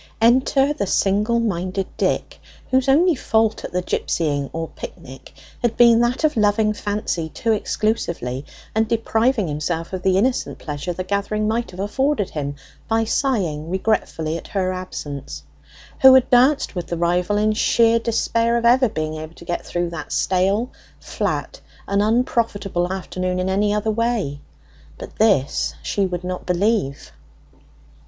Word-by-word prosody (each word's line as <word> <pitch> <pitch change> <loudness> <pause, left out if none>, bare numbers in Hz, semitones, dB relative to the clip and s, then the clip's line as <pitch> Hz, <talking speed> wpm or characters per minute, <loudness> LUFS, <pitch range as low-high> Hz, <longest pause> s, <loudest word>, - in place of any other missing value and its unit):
Enter 260 +4 +3
the 200 -9 -3
single 210 +6 +2
minded 190 -3 -1
Dick, - - -1 0.3
whose 260 0 +2
only 335 +6 +5
fault 220 -5 0
at - - -6
the 180 0 -1
gipsying, 145 -6 -1
or 165 0 -4
picnic, - - -10 0.3
had 240 -2 0
been 235 -1 +6
that 240 +5 0
of 310 - +2
loving 215 0 +2
Fancy 205 -6 -3
too 225 +7 -1
exclusively, 170 - -1 0.3
and 220 0 +1
depriving 225 -1 +1
himself 160 +4 -3
of 185 - -3
the 190 0 +2
innocent 245 +5 0
pleasure 150 +3 -5
the 185 +1 -4
gathering 200 +2 -1
might 230 +2 -1
have 185 - -11
afforded 240 +2 0
him, 145 -2 -4 0.3
by 225 0 +2
sighing 190 - -1
regretfully 170 -5 -1
at - - -13
her 185 -2 -1
absence, 140 - -6 0.6
who 265 0 +9
had 260 - +5
danced 260 +4 +4
with 175 -3 -4
the 170 - -3
rival 175 +4 +1
in 215 +1 +2
sheer 230 +1 +3
despair 230 0 +1
of 235 - -1
ever 250 +1 +5
being 155 -3 -3
able 155 +1 -8
to 170 - -13
get 175 0 -3
through 175 -1 -2
that 155 -3 -7
stale, 195 +6 +1 0.3
flat, - - -3 0.3
and 200 0 +1
unprofitable 210 -5 0
afternoon 185 -1 -3
in 185 +1 -1
any 205 +2 +1
other 210 +1 0
way; 220 -10 -1 0.6
but - - -10
this 130 - +2
she 200 -2 0
would 180 -1 -4
not 180 0 -4
believe. 180 - 0
205 Hz, 155 wpm, -21 LUFS, 175-230 Hz, 0.6 s, who